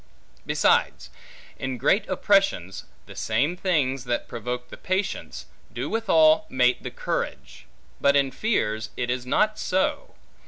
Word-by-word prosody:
Besides, - - +1 0.5
in 130 -1 -3
great 195 - +2
oppressions, 195 - +1 0.2
the - - -12
same 155 +5 0
things 140 -8 0
that 120 -1 -2
provoke 125 +1 -5
the - - -9
patience, 185 - -3 0.3
do 125 +6 -4
withal 160 -8 +4
mate 125 -1 +2
the - - -5
courage; - - -5 0.3
but 140 0 +4
in 140 -1 +2
fears 110 - -1
it 120 -1 -1
is 125 0 -3
not 215 +10 +1
so. 190 - -1
135 Hz, 130 wpm, -25 LUFS, 125-185 Hz, 0.5 s, withal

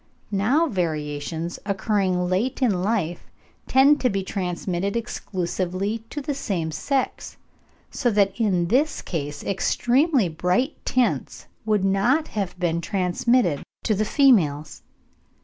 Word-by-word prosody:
Now 230 +12 +2
variations 160 - -3
occurring 195 -3 0
late 195 +8 0
in 215 -9 +1
life 185 -4 -2 0.4
tend 280 +3 +5
to 250 - +3
be 195 -2 -1
transmitted 185 +1 -2
exclusively 190 -1 -2
to 295 - -5
the 285 +1 -2
same 175 -11 -2
sex, 270 - -2 0.5
so 245 - 0
that 200 -3 +2
in 180 -6 +1
this 285 +7 +1
case 145 -3 -4
extremely 245 - +2
bright 180 - -1
tints 250 -1 0 0.2
would 210 -3 +2
not 240 +11 +2
have 195 -4 -4
been 170 -1 0
transmitted 185 - +1 0.2
to 215 - +1
the 210 +1 +1
females. 170 - +2
195 Hz, 120 wpm, -24 LUFS, 175-240 Hz, 0.5 s, tend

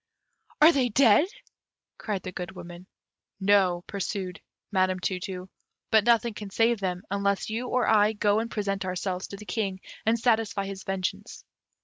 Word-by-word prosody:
"Are 310 +3 +9
they 260 -5 +1
dead?" 240 - +5 0.7
cried 200 -4 -3
the 185 - -5
Good 180 0 -6
Woman. 175 0 -10 0.5
"No," 190 -3 +3
pursued 195 -1 -4 0.3
Madame 185 -2 +1
Tu 185 0 -2
tu; 185 -1 -6 0.4
"but 220 -1 +5
nothing 235 -1 +3
can 210 -1 -7
save 230 +3 +2
them, 180 -1 -3
unless 200 +1 0
you 235 +3 -3
or 250 0 +1
I 215 0 +4
go 205 0 +2
and 230 +1 -3
present 200 -3 -2
ourselves 185 0 -3
to 200 - -8
the 210 - -11
King, 195 -4 -2 0.2
and 225 +1 +2
satisfy 220 -4 +1
his 195 -1 -6
vengeance. 190 -1 -4
200 Hz, 160 wpm, -27 LUFS, 185-220 Hz, 0.7 s, Are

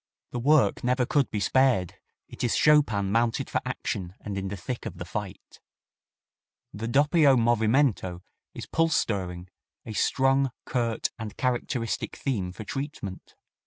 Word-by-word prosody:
The 120 - -3
work 145 +3 +3
never 125 +1 +2
could 140 +1 +1
be 105 - -2
spared; 115 -3 +2 0.3
it - - -8
is 120 - +1
Chopin 110 -11 +3
mounted 115 +1 +1
for - - 0
action 90 0 -4
and 105 -2 -5
in 95 0 -3
the 100 +1 -5
thick 115 +7 -5
of - - -8
the - - -6
fight. - - -7 1.1
The 110 +2 -4
doppio 145 +2 +4
movimento 115 -5 +2 0.3
is - - -6
pulse 165 -1 +1
stirring 90 -4 -2 0.4
a 110 - -6
strong, 135 +5 +2 0.2
curt 115 -3 -1
and 105 -2 -7
characteristic 125 -2 -2
theme 100 -10 -2
for 95 +4 -8
treatment. 120 -6 -6
115 Hz, 145 wpm, -27 LUFS, 100-135 Hz, 1.1 s, doppio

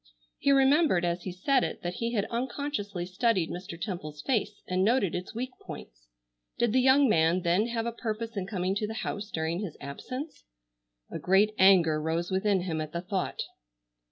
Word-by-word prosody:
He 280 - +3
remembered 275 - +4
as 175 0 -2
he 185 - -3
said 250 +9 +2
it - - -4
that 175 0 -2
he 230 +5 -3
had 205 -4 +1
unconsciously 235 -7 -3
studied 185 -1 +1
Mr. 175 -2 -7
Temple's 155 -7 -5
face 210 -5 -1
and 185 +1 +1
noted 215 -4 +2
its 180 +4 -5
weak 250 +2 -3
points. - - -10 0.5
Did 235 -2 +1
the 260 - +4
young 265 +2 +5
man 170 -3 +3
then 180 +6 +2
have 230 -1 -2
a 235 - -1
purpose 230 0 -4
in 190 -2 -3
coming 185 -2 -1
to 210 - -1
the 220 - -5
house 205 +1 -4
during 160 0 -2
his 195 -7 -5
absence? 255 - -7 0.7
A - - -4
great 200 +3 +3
anger 175 -5 +5
rose 165 +3 -1
within 190 0 +2
him 165 -3 -2
at 155 0 -6
the 170 - -2
thought. 185 0 -2
195 Hz, 185 wpm, -29 LUFS, 175-235 Hz, 0.7 s, young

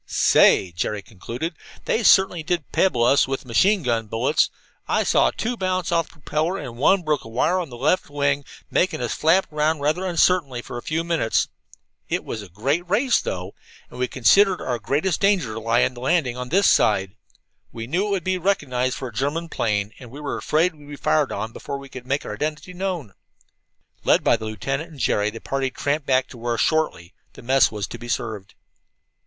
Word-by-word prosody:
"Say," 95 - +4
Jerry 100 +4 -3
concluded, 120 - -6 0.3
"they 230 - +1
certainly 190 -5 +5
did 165 -1 -2
pebble 125 -11 +2
us 130 +3 +4
with 135 0 -4
machine 185 - +3
gun 115 -3 0
bullets! 120 +8 +1 0.4
I - - +2
saw - - +3
two 240 +2 -3
bounce 185 -4 -1
off 165 -1 +1
the - - -19
propeller, 160 +4 -2
and 120 -10 -7
one 180 +8 +3
broke 155 -2 0
a - - -11
wire 150 +11 +1
on 170 -5 -4
the 120 - -9
left 150 +8 +1
wing, 145 0 0 0.3
making 185 +1 +1
us 120 -1 -2
flap 165 +2 +2
around 155 +1 +1
rather 155 +6 0
uncertainly 170 -8 +1
for 120 - -6
a - - -10
few 160 +5 -2
minutes. 165 -9 0 0.6
It - - -2
was 110 - -5
a 100 - -11
great 140 - -1
race, 240 +6 +3
though, 90 +1 -5 0.4
and 125 - -10
we 125 - +1
considered 185 - +4
our 120 -2 -2
greatest 150 - 0
danger 180 - +1
lay 115 +2 +2
in - - -2
landing 130 +1 0
on 125 0 -6
this 195 +6 +4
side. 95 -2 +3 0.6
We 115 -1 -6
knew 175 - 0
it - - -3
would 195 -4 -1
be 185 +1 0
recognized 130 -9 0
for 130 - -5
a - - -15
German 145 +8 -2
plane, 105 -4 -1
and 125 - -11
we 140 +5 -10
were 145 -1 -3
afraid 165 +4 +1
we'd 145 -2 -16
be 145 - -7
fired 150 0 +1
on 110 -1 -4
before 140 - -6
we 140 0 -11
could 130 -1 -10
make 140 +2 -1
our - - -5
identity 150 +9 -4
known." 175 - -4 0.9
Led - - +3
by - - +4
the 110 -1 -6
lieutenant 135 +9 -3
and 150 -4 -13
Jerry, 105 -2 +1
the 115 +1 -8
party 135 +1 -2
tramped 145 +3 -2
back 130 -1 +3
to 120 - -12
where, 120 0 -2
shortly, 155 - 0 0.3
mess 130 +3 +3
was 105 -2 -3
to - - -9
be 120 - -9
served. 110 -5 -4
140 Hz, 205 wpm, -23 LUFS, 120-170 Hz, 0.9 s, certainly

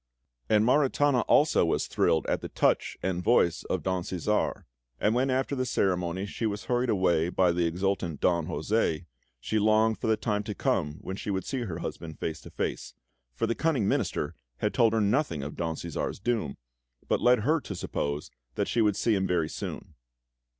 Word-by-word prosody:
And 105 0 +4
Maritana 140 0 +3
also 150 +1 +4
was 85 - +1
thrilled 80 - +1
at - - -1
the - - -6
touch - - +1
and 90 -1 -1
voice 85 -7 +3
of 95 - -2
Don 95 -1 0
Cæsar, 95 +4 -1 0.4
and 105 - +2
when 130 +3 +1
after 130 +2 0
the 130 - 0
ceremony 95 -5 0
she 110 +2 -2
was 105 -1 -4
hurried 125 0 0
away 90 -5 +2
by 90 -1 +3
the 85 0 +1
exultant 90 -2 -1
Don 85 -3 +1
José, 90 -7 0 0.3
she 110 - -1
longed 110 +1 +3
for - - -2
the 110 -1 +3
time 105 -3 -1
to 105 -2 -4
come 75 -4 0
when 95 - -5
she - - -5
should 95 -1 -1
see 135 -2 -2
her 90 -6 -4
husband 80 -2 -6
face 80 0 -4
to - - -11
face, - - -4 0.4
for - - 0
the - - 0
cunning 140 -8 +1
Minister 75 -4 0 0.2
had - - -1
told 115 -1 +4
her 110 - +2
nothing 100 - +1
of 75 - -6
Don 80 -1 -2
Cæsar's 85 0 -4
doom, 105 - -1 0.5
but - - +1
led 125 -1 +5
her 155 +9 +2
to 100 - -6
suppose 75 -4 -3 0.2
that - - 0
she 115 - +1
would 105 -2 +3
see 115 - +1
him 95 -1 +1
very 85 -3 +1
soon. - - -6
100 Hz, 195 wpm, -28 LUFS, 85-115 Hz, 0.5 s, led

